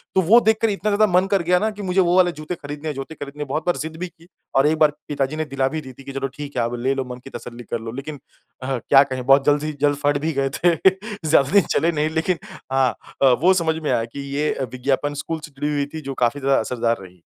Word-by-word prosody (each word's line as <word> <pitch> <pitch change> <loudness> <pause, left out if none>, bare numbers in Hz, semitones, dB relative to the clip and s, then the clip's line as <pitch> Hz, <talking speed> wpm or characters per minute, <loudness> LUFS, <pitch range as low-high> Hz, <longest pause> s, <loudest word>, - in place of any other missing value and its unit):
तो 190 - +5
वो 205 +7 +6
देखकर 220 0 +2
इतना 210 +1 -1
ज़्यादा 215 +1 +4
मन 180 +1 +5
कर 195 - +3
गया 180 +2 +3
ना 220 - +1
कि 210 -1 -9
मुझे 190 0 0
वो 175 -1 +2
वाले 180 -1 +5
जूते 155 +3 -6
खरीदने 145 0 -7
हैं, 150 - -3
जूते 135 +4 -6
खरीदने 145 0 -6
बहुत 145 +3 -3
बार 175 - +1
ज़िद 160 +1 -5
भी 180 +2 -4
की 170 -1 -21 0.3
और 135 +2 +5
एक 160 +1 +2
बार 155 -1 +5 0.2
पिताजी 145 0 -1
ने 155 0 -2
दिला 135 -2 0
भी 155 +3 -3
दी 130 -2 -11
थी 135 - -14
कि, 140 - -8
"चलो 135 0 -2
ठीक 140 0 -8
है 120 - +2
आप 120 +1 -2
ले 130 +3 +1
लो 135 -1 -2
मन 125 0 -7
की - - -10
तसल्ली 120 -1 -9
कर 120 - -1
लो।" 115 0 -6
लेकिन 140 +4 -7 0.4
अह 130 0 -1
क्या 135 +4 +5
कहें 130 -2 -5
बहुत 135 +1 +5
जल्द 145 0 +3
ही 155 0 -2
जल्द 145 -1 +3
फ़ट 145 0 +3
भी 160 - +1
गए 135 0 +1
थे। 175 -1 +4 0.5
ज़्यादा 140 -3 +4
दिन 200 +1 +6
चले 170 - +3
नहीं 155 -1 0
लेकिन 160 +3 0 0.3
हाँ 135 -1 +3 0.3
अ, - - +6 0.2
वो 185 +3 +6
समझ 165 -3 +1
में 150 - 0
आया 115 - +1
कि 120 +5 -10 0.2
ये 145 - 0 0.3
विज्ञापन 135 +3 -1
स्कूल 165 -1 -3
से 150 - -15
जुड़ी 145 +2 -2
हुई 145 -1 0
थी 160 - -5
जो 135 -2 -5
काफ़ी 120 +4 +1
ज़्यादा 135 0 +2
असरदार 115 0 0
रही। 90 -2 -14
145 Hz, 275 wpm, -22 LUFS, 135-165 Hz, 0.5 s, वो